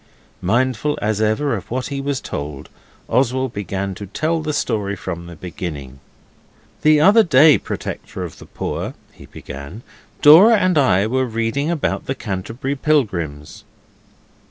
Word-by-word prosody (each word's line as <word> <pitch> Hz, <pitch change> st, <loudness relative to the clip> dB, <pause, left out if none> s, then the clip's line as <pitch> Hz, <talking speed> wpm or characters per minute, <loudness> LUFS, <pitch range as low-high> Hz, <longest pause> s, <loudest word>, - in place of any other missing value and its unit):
Mindful, 130 Hz, +8 st, 0 dB
as 105 Hz, 0 st, -1 dB
ever, 110 Hz, +5 st, +1 dB
of 100 Hz, -, -8 dB
what 130 Hz, +3 st, -3 dB
he 140 Hz, -1 st, -3 dB
was 140 Hz, -1 st, -2 dB
told, 70 Hz, -1 st, -6 dB, 0.4 s
Oswald 130 Hz, 0 st, 0 dB
began 100 Hz, -1 st, -3 dB
to 100 Hz, +2 st, -8 dB
tell 160 Hz, -, -1 dB
the 155 Hz, 0 st, -2 dB
story 105 Hz, -8 st, -1 dB
from 85 Hz, -3 st, -6 dB
the 85 Hz, -, -10 dB
beginning. 75 Hz, -6 st, -7 dB, 0.8 s
'The 155 Hz, 0 st, +5 dB
other 200 Hz, +8 st, +6 dB
day, 155 Hz, -4 st, +6 dB
protector -, -, -6 dB
of -, -, -8 dB
the -, -, -13 dB
poor,' -, -, -4 dB, 0.2 s
he -, -, -15 dB
began; 70 Hz, -, -9 dB, 0.4 s
'Dora 185 Hz, +10 st, +8 dB
and 185 Hz, -3 st, +2 dB
I 100 Hz, -8 st, +3 dB
were 130 Hz, +3 st, 0 dB
reading 115 Hz, +6 st, -1 dB
about 170 Hz, -4 st, -2 dB
the 135 Hz, -, -1 dB
Canterbury 115 Hz, +5 st, -4 dB
pilgrims... 95 Hz, -, -1 dB
120 Hz, 145 wpm, -20 LUFS, 95-145 Hz, 0.8 s, Dora